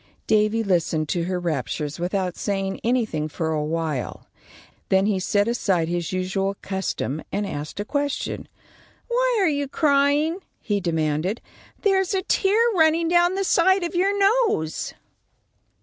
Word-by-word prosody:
Davy 215 +1 +2
listened 165 -5 0
to 170 -1 0
her 180 0 -2
raptures 150 -1 -3
without 180 0 -1
saying 195 -1 -2
anything 225 -11 0
for 160 +1 -3
awhile. 155 -2 -2 0.6
Then 190 0 +3
he 205 -2 +1
set 205 +3 +1
aside 190 -8 +1
his 175 -1 -2
usual 190 +1 -1
custom 190 -6 -3
and 205 +1 -1
asked 150 -1 -6
a 205 - -2
question. 285 +3 -2 0.6
"Why - - +2
are 385 - +3
you 285 -2 0
crying?" 290 +3 +2 0.2
he 205 -1 -1
demanded. 165 +3 -1 0.4
"There's 385 -2 +2
a 375 - 0
tear 395 +2 +2
running 325 -1 +3
down 350 +1 +3
the 390 - 0
side 375 +1 +3
of 340 - -3
your 390 +3 +1
nose." 400 - +1
205 Hz, 140 wpm, -23 LUFS, -, 0.6 s, Then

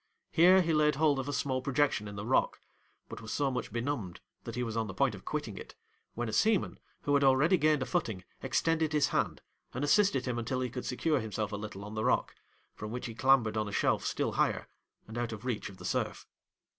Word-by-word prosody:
Here 180 +3 +6
he 165 -1 +1
laid 150 -1 +3
hold 150 -2 +3
of 135 +2 -3
a - - -2
small 130 -1 -1
projection 135 -5 +1
in 100 - -7
the 100 +1 -5
rock, 130 - +2 0.5
but - - -8
was 110 - -7
so 140 -2 +1
much 125 -1 -4
benumbed 115 -7 -3 0.3
that - - -5
he 125 - -1
was 115 -2 -4
on 110 -1 0
the 95 - -7
point 135 +1 +2
of 95 - -10
quitting 145 -10 -4
it, - - -11 0.4
when 120 0 -2
a 110 - -4
seaman, 215 - +2 0.2
who 145 - +1
had 140 0 +4
already 135 +7 +5
gained 155 -4 +3
a - - -4
footing, 110 - -2 0.2
extended 160 +4 +1
his 150 -2 +3
hand, - - -1 0.3
and 130 - -2
assisted 145 -4 +3
him 125 -2 -1
until 125 +3 -2
he 125 -2 -2
could 125 0 -5
secure 150 +3 +1
himself 110 -2 -3
a - - -2
little 105 -1 -7
on 105 - -8
the 110 0 -2
rock; - - +1 0.4
from 105 - -7
which 125 +3 -5
he 115 - -5
clambered 120 -2 +3
on 110 -1 0
a - - -5
shelf - - +1
still - - -1
higher, - - 0 0.4
and 110 +2 -5
out 120 -1 -2
of 110 -2 -6
the - - -13
reach 120 -6 -2
of 95 - -13
the - - -10
surf. - - -2
125 Hz, 240 wpm, -31 LUFS, 110-145 Hz, 0.5 s, Here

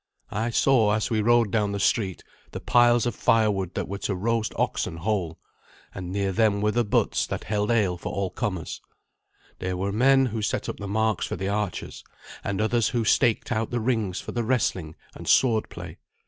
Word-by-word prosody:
I 110 +3 -1
saw, 115 -3 +3
as 110 +2 -1
we 110 -1 +2
rode 115 -1 +3
down 105 -2 +1
the 100 - -2
street, 100 -2 0 0.3
the - - -4
piles 120 -1 +4
of 120 - -1
firewood 100 -5 +1
that - - -2
were 100 +1 -5
to 100 - -2
roast 110 +2 -1
oxen 80 - -1
whole, 90 -3 -2 0.6
and 90 -1 -6
near 100 0 -1
them 105 0 +2
were 105 +1 +1
the 120 +2 +1
butts 105 - +1
that - - -4
held 105 0 -1
ale 100 -7 +1
for - - -5
all 100 -2 -2
comers. 95 -5 -4 0.8
There 90 0 -3
were 100 +2 -2
men 135 +5 +4
who 115 -3 -3
set 105 - -2
up - - -4
the 100 - -6
marks 110 0 0
for - - -3
the 95 +1 -3
archers, 100 -2 -3 0.4
and 100 -1 -2
others 110 +1 +2
who 120 -3 -1
staked 120 +2 +2
out 110 -1 0
the 120 - -1
rings 110 -6 -1
for - - -7
the 120 - -2
wrestling 95 -10 -1 0.2
and - - -10
sword 115 -4 +3
play. - - -9
105 Hz, 200 wpm, -25 LUFS, 100-115 Hz, 0.8 s, piles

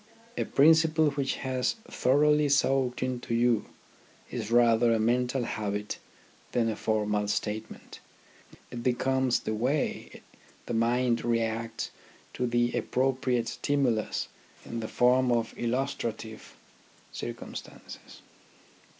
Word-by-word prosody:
A - - -1
principle 160 +1 +4
which 140 -1 -1
has 130 -1 0
thoroughly 150 +2 +3
soaked 135 -3 +2
into 125 -2 -2
you 120 -2 +2 0.6
is 110 -4 -4
rather 120 0 +4
a 115 - +2
mental 125 +3 +1
habit 105 -2 -3 0.5
than 115 -2 +2
a 110 - -2
formal 105 -1 0
statement. 105 +1 -4 0.7
It 120 - -5
becomes 130 +1 +1
the 110 - -3
way 130 +7 -2 0.4
the - - -4
mind 120 +1 +1
reacts 115 -1 -1 0.4
to 125 - -1
the 120 0 +1
appropriate 130 -2 0
stimu 140 -1 +1
lus 110 - -3 0.4
in 115 - -5
the 110 - -4
form 125 +2 +3
of 115 -1 0
illustrative 115 -3 -3 0.6
circumstances. - - -9
120 Hz, 110 wpm, -28 LUFS, 115-130 Hz, 0.7 s, principle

